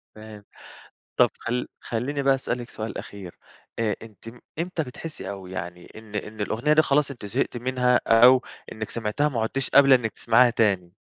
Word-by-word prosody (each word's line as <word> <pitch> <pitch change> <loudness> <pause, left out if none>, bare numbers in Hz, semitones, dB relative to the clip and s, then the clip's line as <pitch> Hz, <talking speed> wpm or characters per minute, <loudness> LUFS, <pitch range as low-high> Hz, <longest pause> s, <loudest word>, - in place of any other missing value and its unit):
فاهم. 110 -1 -11 0.7
طب - - +5
خلّ 125 +1 -3
خلّيني 135 +5 -3
بقى 135 0 +4
أسألِك 125 -2 -4
سؤال 110 +1 -6
أخير. 95 -4 -9 0.4
آآ 110 -3 0
أنتِ 110 -1 -13
م 120 +1 -12 0.2
امتى 170 0 -2
بتحسي 145 +2 -8
أو 95 -2 -8
يعني 90 -1 -7
إن 110 -1 -13
إن 105 +1 -5
الأغنية 115 +8 0
دي 155 +1 +5
خلاص 145 -1 +1
أنتِ 120 -6 -8
زهقتِ 100 - -2
منها 125 0 +1
أو 125 +3 +6 0.3
إنكِ 110 -1 -6
سمعتيها 115 +6 -1
وما 130 -6 -1
عدتيش 130 +4 -2
قابلة 140 -1 +7
إنِك 120 -3 +1
تسمعيها 120 +2 +4
تاني؟ 100 -7 +1
115 Hz, 175 wpm, -24 LUFS, 105-130 Hz, 0.7 s, قابلة